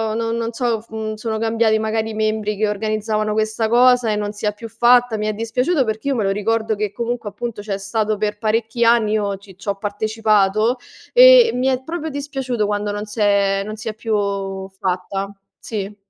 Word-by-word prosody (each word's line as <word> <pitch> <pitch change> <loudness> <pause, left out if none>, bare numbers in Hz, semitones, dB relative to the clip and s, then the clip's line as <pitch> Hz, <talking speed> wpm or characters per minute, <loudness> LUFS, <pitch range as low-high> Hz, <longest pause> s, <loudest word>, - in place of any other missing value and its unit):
no 230 0 -1
non 230 0 -2
so, 230 -2 -1
mhmm, 220 0 -4
sono 220 0 -3
cambiati 225 0 +2
magari 220 0 -1
i - - -7
membri 215 -1 -1
che 215 +1 +1
organizzavano 215 0 -1
questa 215 +1 0
cosa 245 0 +4
e - - 0
non 210 0 -3
si 210 - -6
è 210 - 0
più 230 +2 -8
fatta, 240 0 +4
mi 210 0 -2
è 215 - 0
dispiaciuto 250 +8 0
perché 220 +3 -3
io 275 - +1
me 225 - 0
lo 195 - +1
ricordo 220 +2 0
che 210 -1 -2
comunque, 235 -1 -3
appunto, 210 +1 -6
c'è 205 -2 -3
stato 210 +2 -1
per 210 0 -2
parecchi 225 +2 0
anni, 230 -2 +4
io 205 -2 0
ci 195 -1 -16
c'ho 200 +1 -3
partecipato 215 +2 +1 0.4
e - - +8
mi 250 +1 0
è 260 -1 0
proprio 320 +2 -4
dispiaciuto 270 -6 -3
quando 205 0 -1
non 205 +1 -4
s'è 200 -2 +1
non 215 +1 -5
si 220 +1 -9
è - - -4
più 200 -3 -2
fatta, 190 +1 -3 0.3
sì. 205 -2 -5
215 Hz, 200 wpm, -20 LUFS, 205-230 Hz, 0.4 s, e